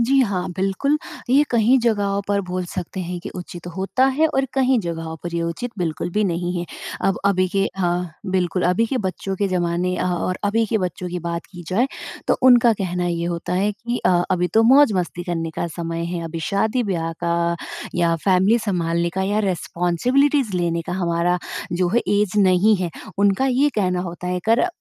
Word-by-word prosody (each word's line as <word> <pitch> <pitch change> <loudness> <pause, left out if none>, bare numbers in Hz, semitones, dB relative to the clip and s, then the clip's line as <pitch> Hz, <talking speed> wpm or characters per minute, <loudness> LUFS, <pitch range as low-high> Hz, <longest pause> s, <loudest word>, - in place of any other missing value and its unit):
जी 270 +4 +3
हाँ, 200 -7 0
बिल्कुल 195 +11 +1 0.3
ये 280 +3 +6
कहीं 240 +2 +4
जगहों 205 -4 +1
पर 200 0 +2
बोल 180 0 -2
सकते 180 +2 -5
हैं 180 0 -4
कि - - -7
उचित 175 -1 -8
होता 195 +7 +1
है 320 - +5
और 270 -3 +1
कहीं 260 -2 +3
जगहों 165 -2 -5
पर 170 -1 -5
ये 170 - 0
उचित 170 +9 -3
बिल्कुल 165 0 -2
भी 210 +3 +1
नहीं 175 0 -1
है। 175 - -2 0.4
अब 195 - +1
अभी 185 -2 +3
के 195 +1 +1
हाँ, 175 -2 -1 0.2
बिल्कुल। 180 -1 0
अभी 190 +6 +2
के 255 +2 -1
बच्चों 190 -1 -3
के 200 0 0
ज़माने 180 0 0
अ, - - -1
और 180 +1 -1
अभी 225 +3 +2
के 220 +1 0
बच्चों 180 -1 -3
की 180 0 -3
बात 170 0 -4
की 175 -2 -10
जाए 230 +8 +2 0.4
तो - - +4
उनका 245 -2 +7
कहना 180 -3 -2
ये 170 -1 -1
होता 170 +1 -3
है 205 +3 +1
कि 235 +4 -4
अ, 175 -1 +4
अभी 180 0 +1
तो 225 - +6
मौज़-मस्ती 220 -9 +4
करने 165 -2 -2
का - - -1
समय 165 0 -3
है। 170 0 -3
अभी 165 0 -5
शादी-ब्याह 200 -4 0
का 170 0 +1 0.4
या 170 -1 +2
फैमिली 195 +4 +4
सँभालने 170 -5 0
का 190 - 0
या 205 +2 0
रिस्पांसिबिलिटीज़ 215 - +1
लेने 170 -1 0
का 175 - -3
हमारा 175 -1 +1 0.3
जो 175 0 +1
है 240 - +4 0.2
ऐज 210 -3 0
नहीं 195 +2 +4
है। 180 -2 -2 0.3
उनका 200 +6 +3
ये 265 +3 +3
कहना 185 -4 +1
होता 180 0 -6
है 180 0 -1
कर 235 +10 +4
185 Hz, 195 wpm, -21 LUFS, 175-215 Hz, 0.4 s, उनका